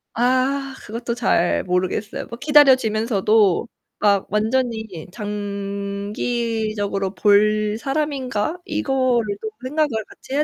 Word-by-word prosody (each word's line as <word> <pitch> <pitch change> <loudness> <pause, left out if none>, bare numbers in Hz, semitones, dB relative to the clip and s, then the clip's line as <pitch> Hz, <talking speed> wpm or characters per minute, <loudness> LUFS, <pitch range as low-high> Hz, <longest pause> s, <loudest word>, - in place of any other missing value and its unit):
아 260 +3 +1
그것도 235 +2 -4
잘 195 -7 +1
모르겠어요. 185 +3 -2
뭐 235 - -8
기다려지면서도 225 - +4 0.3
막 200 -2 +2
완전히 220 -5 -1
'장기적으로 205 0 -3
볼 210 +1 +3
사람인가?' 275 -1 -2
이거를 260 -6 +1 0.2
좀 220 - -3
생각을 300 +3 +1 0.2
같이 - - -11
해야 295 +2 +3
220 Hz, 245 characters per minute, -21 LUFS, 205-255 Hz, 0.3 s, 기다려지면서도